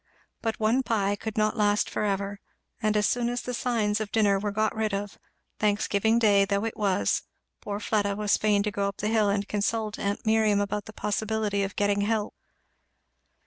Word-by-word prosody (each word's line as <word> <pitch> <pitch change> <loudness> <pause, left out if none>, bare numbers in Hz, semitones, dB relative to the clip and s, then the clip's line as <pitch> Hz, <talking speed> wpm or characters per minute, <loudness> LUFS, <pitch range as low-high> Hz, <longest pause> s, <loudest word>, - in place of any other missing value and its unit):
But 225 -1 -2
one 225 +4 +2
pie 205 -5 0
could 220 +1 -6
not 215 +1 +2
last 205 -1 +2
for - - -3
ever; 200 0 -2 0.4
and 215 -1 +2
as 210 - +2
soon 240 -1 0
as 245 0 -3
the 250 - -4
signs 225 -4 0
of 215 -1 -4
dinner 205 -3 +3
were 205 +1 -2
got 215 +1 0
rid 215 -2 0
of, 200 0 -5 0.4
Thanksgiving 210 +1 +2
day 205 -4 +5
though 200 +2 0
it 225 - -3
was, 190 - +1 0.4
poor 205 -1 -4
Fleda 205 -1 0
was 210 0 +2
fain 210 -1 +2
to 210 - -1
go 200 -1 -1
up 200 - -5
the 210 - -1
hill 215 -2 +3
to 200 - -4
consult 210 +1 -2
aunt 200 +2 -2
Miriam 220 -2 +3
about 205 0 -2
the - - -9
possibility 210 -1 -1
of 195 0 -3
getting 205 0 +1
"help." 210 0 -1
210 Hz, 195 wpm, -27 LUFS, 200-220 Hz, 0.4 s, day